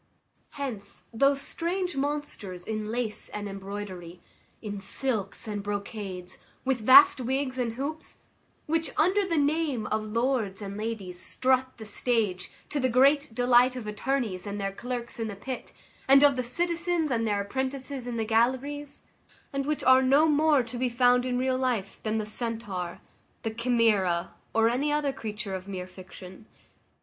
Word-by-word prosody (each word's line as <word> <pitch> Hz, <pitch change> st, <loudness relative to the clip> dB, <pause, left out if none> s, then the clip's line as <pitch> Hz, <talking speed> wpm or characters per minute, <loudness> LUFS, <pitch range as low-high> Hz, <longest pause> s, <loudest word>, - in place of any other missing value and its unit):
Hence 250 Hz, -8 st, -5 dB
those 275 Hz, +4 st, +3 dB
strange 355 Hz, +3 st, -2 dB
monsters 275 Hz, -11 st, -3 dB
in 215 Hz, -1 st, -3 dB
lace 230 Hz, -2 st, -3 dB
and 205 Hz, 0 st, -5 dB
embroidery, 195 Hz, -3 st, -7 dB, 0.4 s
in 205 Hz, -2 st, -5 dB
silks 205 Hz, 0 st, -3 dB
and 205 Hz, -1 st, -3 dB
brocades, 200 Hz, -3 st, -5 dB, 0.3 s
with 260 Hz, -1 st, +1 dB
vast 375 Hz, +5 st, +9 dB
wigs 260 Hz, +1 st, -1 dB
and 235 Hz, -2 st, 0 dB
hoops; 290 Hz, +6 st, -5 dB, 0.4 s
which, 325 Hz, -1 st, +1 dB
under 375 Hz, +5 st, +3 dB
the 335 Hz, -3 st, 0 dB
name 290 Hz, -5 st, +1 dB
of 215 Hz, +1 st, 0 dB
lords 230 Hz, -3 st, 0 dB
and 200 Hz, -1 st, -6 dB
ladies, 210 Hz, -5 st, -4 dB
strut 260 Hz, +6 st, +1 dB
the 220 Hz, -, -9 dB
stage, 210 Hz, -4 st, -1 dB, 0.2 s
to 295 Hz, -, -1 dB
the 260 Hz, -1 st, +2 dB
great 275 Hz, +1 st, +4 dB
delight 245 Hz, +1 st, +4 dB
of 250 Hz, -4 st, -6 dB
attorneys 210 Hz, -3 st, -2 dB
and 205 Hz, 0 st, -4 dB
their 195 Hz, 0 st, -1 dB
clerks 240 Hz, +3 st, -5 dB
in 225 Hz, -, -1 dB
the 205 Hz, -, -5 dB
pit, 255 Hz, +5 st, -6 dB, 0.4 s
and 275 Hz, +1 st, +7 dB
of 285 Hz, -2 st, +6 dB
the 255 Hz, -, 0 dB
citizens 340 Hz, +4 st, -1 dB
and 230 Hz, -2 st, +1 dB
their 205 Hz, -1 st, +1 dB
apprentices 265 Hz, +4 st, -4 dB
in 240 Hz, -1 st, -3 dB
the 225 Hz, -, 0 dB
galleries; 260 Hz, +6 st, 0 dB, 0.5 s
and 275 Hz, 0 st, -2 dB
which 305 Hz, -1 st, -1 dB
are 260 Hz, 0 st, +7 dB
no 275 Hz, +4 st, +5 dB
more 300 Hz, -2 st, +4 dB
to 240 Hz, +1 st, -7 dB
be 255 Hz, 0 st, +1 dB
found 245 Hz, +1 st, +3 dB
in 250 Hz, -1 st, 0 dB
real 255 Hz, 0 st, +1 dB
life 235 Hz, -7 st, -1 dB
than 220 Hz, 0 st, -1 dB
the 215 Hz, -, -1 dB
centaur, 215 Hz, -6 st, -3 dB, 0.4 s
the 225 Hz, -, -1 dB
chimera, 220 Hz, -7 st, +2 dB, 0.2 s
or 225 Hz, 0 st, +5 dB
any 265 Hz, +6 st, +1 dB
other 295 Hz, -2 st, +1 dB
creature 210 Hz, -4 st, -5 dB
of 190 Hz, 0 st, -5 dB
mere 185 Hz, -2 st, -5 dB
fiction. 185 Hz, +2 st, -12 dB
240 Hz, 160 wpm, -28 LUFS, 205-275 Hz, 0.5 s, vast